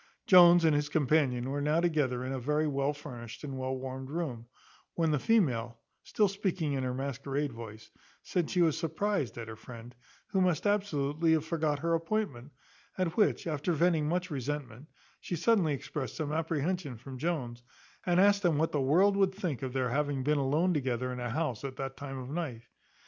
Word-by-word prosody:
Jones 175 -2 +8
and 160 - +5
his 145 0 0
companion 135 -4 +1
were 145 +1 -2
now 150 +3 +2
together 145 -7 0
in 130 - -3
a 135 - -2
very 150 +5 0
well 140 -1 0
furnished 125 -5 -9
and 140 -2 -5
well 130 0 -2
warmed 130 0 -6
room; 140 -8 -4 0.5
when 165 -2 +1
the 150 - +1
female, 125 - +1 0.2
still 210 - +1
speaking 190 -6 -1
in 135 -1 -1
her 130 - -1
masquerade 140 +2 -3
voice, 115 -1 -10 0.3
said 175 -3 -1
she 180 -2 +3
was 160 -3 +3
surprized 165 - -1
at 115 -1 -6
her 110 - -7
friend, 120 +1 -11 0.4
who 190 - +1
must 180 -1 +1
absolutely 165 -6 +1
have 160 -1 +1
forgot 160 -3 0
her 165 +3 -1
appointment; 165 - -2 0.5
at 185 -3 -1
which, 215 - +2
after 155 +1 -1
venting 160 -2 +2
much 180 +1 -1
resentment, 140 -1 -4 0.3
she 175 - -4
suddenly 170 -4 +2
exprest 135 +1 -5
some 150 -2 -3
apprehension 160 -2 -1
from 130 +2 -9
Jones, 130 -7 -2 0.4
and 175 0 +2
asked 200 +1 +5
him 170 -5 +3
what 160 +2 +1
the 145 - 0
world 180 +9 +4
would 195 -1 +2
think 175 - -3
of 130 - -3
their 130 -1 0
having 140 0 -1
been 150 +1 +2
alone 155 +7 +2
together 130 -3 -1
in 125 - -6
a 120 -1 -3
house 135 -3 -2
at 135 -1 -5
that 135 0 -5
time 135 -1 -7
of 130 -1 -6
night? 135 -6 -4
150 Hz, 190 wpm, -30 LUFS, 130-170 Hz, 0.5 s, Jones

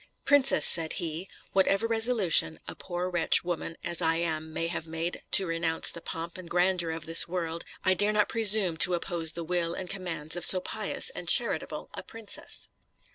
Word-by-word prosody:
"Princess," 285 -2 +4
said 165 -2 +5
he, 165 +3 -3 0.2
"whatever 195 +3 +2
resolution 225 - +2
a 85 - -6
poor 175 - -5
wretched 175 -3 +2
woman 170 -1 -5
as 170 0 -3
I 165 -1 +1
am 160 -2 -3
may 165 - -3
have 165 -1 -5
made 165 +2 -5
to 195 - +5
renounce 165 -1 -1
the 170 - -10
pomp 165 +3 -7
and 175 -2 -11
grandeur 180 -1 0
of 160 0 -6
this 165 +1 +4
world, 170 -2 -5 0.2
I 185 - +4
dare 205 +3 +2
not 210 -1 +1
presume 210 -6 +4
to 180 +2 +4
oppose 170 -2 0
the 170 - -5
will 170 0 -2
and 185 - -6
commands 175 -5 -5
of 175 - -5
so 185 - +6
pious 185 - -3
and - - -6
charitable - - 0
a - - -7
princess." 225 -2 -9
175 Hz, 185 wpm, -27 LUFS, 165-190 Hz, 0.2 s, so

